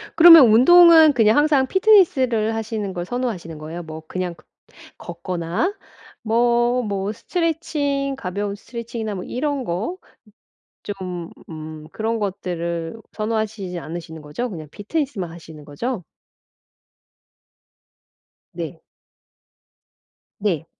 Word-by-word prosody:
그러면 330 -5 +10
운동은 320 +5 +7
그냥 225 0 +4
항상 290 -3 +3
피트니스를 265 - +3
하시는 220 -3 -4
걸 175 -1 -4
선호하시는 215 -9 -4
거예요? 160 +3 -7
뭐 160 0 -8
그냥 180 0 -3
걷 155 - -23 0.5
걷거나 175 - -3 0.5
뭐 240 +2 +2
뭐 200 -1 -2
스트레칭 290 - -2
가벼운 200 -1 -4
스트레칭이나 230 -1 -6
뭐 185 -2 -6
이런 280 +1 -2
거 210 - -3 0.9
좀 180 -4 -6 0.2
음 155 -1 -8
그런 225 +1 -2
것들을 170 -3 -3 0.2
선호하시지 215 -4 -3
않으시는 160 -1 -8
거죠? 150 +12 -4
그냥 160 -6 -8
피트니스만 220 - -3
하시는 160 -2 -12
거죠? 200 - -4 2.5
네. - - -6 1.6
네. 180 -7 -1
215 Hz, 245 characters per minute, -21 LUFS, 175-255 Hz, 2.5 s, 그러면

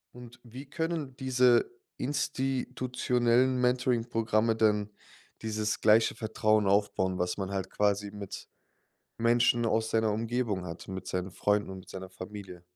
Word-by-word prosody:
Und 120 0 -12
wie 125 +4 -10
können 160 -1 -3
diese 125 -2 +3 0.3
institutionellen 130 -2 0
Mentoring-Programme 115 -3 +1
denn 105 -2 +2 0.5
dieses 110 -1 -2
gleiche 110 +1 +4
Vertrauen 110 -1 +1
aufbauen, 100 -2 +1
was 90 0 0
man 95 -1 -4
halt 95 -1 -3
quasi 100 0 0
mit 100 -2 -8 0.7
Menschen 120 +1 +3
aus 110 0 +1
seiner 110 -1 +2
Umgebung 115 -3 -1
hat, 85 -1 -8
mit 95 -1 -6
seinen 90 0 -3
Freunden 105 -1 0
und 95 - -7
mit 95 - -15
seiner 95 0 -7
Familie? 95 -1 -9
110 Hz, 130 wpm, -29 LUFS, 100-125 Hz, 0.7 s, gleiche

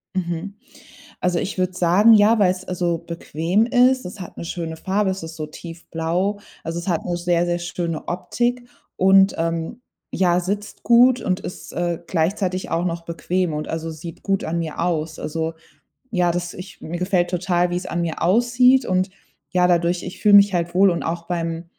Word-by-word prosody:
Mhm. 175 +2 -3 0.7
Also, 180 -1 +1
ich 195 - -4
würde 185 0 0
sagen, 185 +6 +5
ja, 215 +1 +5
weil's, 185 -1 +2
also, 175 -2 -1
bequem 170 +5 -1
ist. 255 0 +3
Es 185 +3 -8
hat 180 - -10
'ne - - -6
schöne 165 -1 -5
Farbe, 195 +3 0
es 190 -2 -3
ist 160 0 -8
so 155 -1 -4
tiefblau, 170 +4 -3 0.2
also, 165 +1 -3
es 175 - -8
hat 170 -3 -1
'ne 175 -1 -1
sehr, 175 0 +1
sehr 175 0 -1
schöne 170 -2 -4
Optik 240 +7 -2 0.3
und 195 +1 +5
ähm, 165 +7 -2 0.3
ja, 180 -1 +3
sitzt 205 +4 -4
gut 245 +1 +5
und 185 +1 -1
ist, - - -8
äh, 175 -1 -1
gleichzeitig 185 +2 -1
auch 170 +2 0
noch 170 -1 -3
bequem 170 +1 -1
und, 150 0 -4
also, 160 0 -4
sieht 160 +1 -9
gut 195 -1 0
an 170 +1 -2
mir 160 -1 -5
aus. 160 -2 -1
Also, 160 +1 -3 0.6
ja, 180 -3 +2
das 175 0 -3
ich 185 +1 -10
mir 170 +2 -5
gefällt 180 -1 +1
total, 180 0 +1
wie's 180 +1 -2
an 175 - -2
mir 165 -1 -3
aussieht, 240 +7 +4
und, 185 +1 +1 0.4
ja, 180 -1 +3
dadurch 175 0 +1
ich 180 - -8
fühle 205 -1 +6
mich 200 -1 +7
halt 175 0 -1
wohl 195 +1 +6
und 170 - -2
auch 170 +1 -3
beim 165 -1 -3
175 Hz, 185 wpm, -22 LUFS, 170-195 Hz, 0.7 s, mich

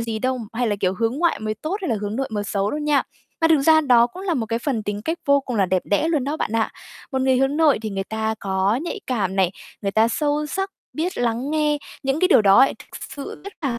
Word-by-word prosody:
gì 225 -1 -3
đâu, 255 +2 -1
hay 245 +1 0
là, 205 -2 0
kiểu, 185 0 +1
hướng 230 +5 -1
ngoại 340 0 +2
mới 215 0 -2
tốt 310 - -3
hay - - -2
là 225 - +1
hướng 210 +2 -3
nội 270 0 -2
mới 205 -1 -2
xấu 200 0 -1
đâu 300 - -3
nha. 295 -2 +2 0.4
Mà 325 - +4
thực 310 -3 +5
ra 315 +1 +6
đó 245 -5 +5
cũng 365 +10 -10
là 365 -4 0
một 225 -3 -1
cái 230 +1 -1
phần 240 -3 -2
tính 205 0 -4
cách 330 +2 -2
vô 280 0 +4
cùng 250 -4 -4
là 195 -2 +3
đẹp 185 0 +1
đẽ 205 +10 +1
luôn 300 -6 +1
đó 290 +2 -2
bạn 225 - -3
ạ. 225 -1 +1 0.4
Một 265 - 0
người 260 -1 +3
hướng 270 +2 +1
nội 310 -7 +4
thì 215 - -3
người 195 0 -3
ta 220 +1 -2
có 195 +4 +1
nhạy 345 +4 -4
cảm 200 -7 -1
này, 190 -2 +3 0.3
người 195 - 0
ta 220 +2 +3
sâu 295 +4 0
sắc, 385 +5 -3 0.2
biết 340 +4 -3
lắng 240 +3 -1
nghe 300 -1 +1 0.2
những 270 +3 0
cái 365 - +4
điều 235 - +6
đó 200 +7 +7
thực - - -12
sự 280 - -8
rất 400 - -7
là 245 -4 -1
250 Hz, 275 wpm, -22 LUFS, 215-300 Hz, 0.4 s, đó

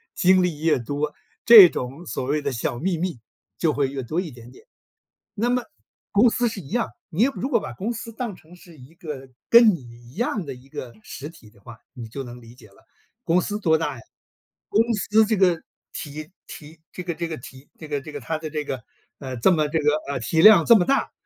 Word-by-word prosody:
精 185 0 +4
力 170 -5 -2
越 160 -1 +3
多， 145 +5 -3 0.3
这 215 -6 +10
种 135 +7 -6
所 140 - -4
谓 150 +3 0
的 - - -1
小 120 0 -3
秘 175 +3 -1
密， 175 -7 -3 0.4
就 155 +4 +1
会 140 -1 +1
越 135 0 -5
多 155 +9 -2
一 180 - -6
点 120 -1 -14
点。 130 - -18 0.7
那 230 +3 0
么， 250 0 +1 0.5
公 220 +4 +5
司 245 +1 0
是 215 -3 -5
一 135 - -13
样， 235 +1 0 0.2
你 185 +8 +2
如 265 - -3
果 235 -5 +3
把 125 - -7
公 200 - -3
司 230 0 -8
当 225 -3 -5
成 165 +3 -17
是 175 -2 -17
一 130 +4 -16
个 145 -6 -8 0.2
跟 235 -2 +8
你 160 - -10
一 120 0 -15
样 215 -4 -2
的 140 - -6
一 130 +2 -18
个 125 -3 -8
实 140 - -8
体 115 -9 -17
的 105 -1 -24
话， 115 +2 -12 0.2
你 120 -3 -8
就 135 +5 -6
能 120 -1 -10
理 115 +1 -15
解 120 -4 -16
了， 100 - -24 0.4
公 175 +2 +3
司 205 +3 -4
多 160 -6 +3
大 150 -4 -3
呀， - - -12 0.7
公 215 - +3
司 215 +1 +3
这 220 +1 +1
个 180 -4 +3 0.3
体 155 +3 -7 0.2
体 155 +1 -12
这 180 - -6
个 175 -1 -3
这 170 0 -3
个 165 - -5
体 130 +3 -13
这 155 - -9
个 145 -1 -1
这 155 - -10
个 145 - -5
它 160 +5 -3
的 155 0 -6
这 150 0 -3
个， 130 -3 -4 0.4
呃 130 -2 -6
这 120 - +4
么 155 -4 +2
这 160 - 0
个， 150 0 +3 0.2
呃 140 - -2
体 160 +7 +1
量 200 -4 +8
这 235 - +7
么 180 - +1
大， 275 - +1
155 Hz, 250 characters per minute, -23 LUFS, 135-190 Hz, 0.7 s, 这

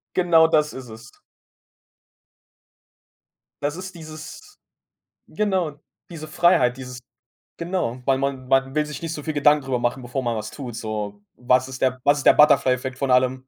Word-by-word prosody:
Genau 170 -3 +5
das 150 -2 +1
ist 130 -3 -9
es. 110 +1 -12 2.5
Das 145 +2 -2
ist 185 0 -8
dieses 160 - -11 0.7
genau, 190 -7 -1 0.4
diese 155 -2 -8
Freiheit, 140 -7 +3
dieses 125 -1 -9 0.6
genau, 170 -8 -3
weil 135 -1 +2
man 135 -2 -3
man 135 0 +2
will 150 0 +1
sich 150 +1 -8
nicht 165 -1 -4
so 150 - -6
viel 155 - -2
Gedanken 145 0 +3
drüber 130 -2 -2
machen, 120 +2 -1
bevor 125 +2 -4
man 120 -2 -1
was 110 0 -5
tut, 125 -5 -7
so: 105 -2 -5 0.2
„Was 125 +1 +2
ist 130 -1 -8
der 130 0 +1
was 145 0 +4
ist 135 - -5
der - - +8
Butterfly-Effekt 130 -3 +3
von 135 -2 -1
allem?“ 130 +1 +3
135 Hz, 165 wpm, -22 LUFS, 125-155 Hz, 2.5 s, der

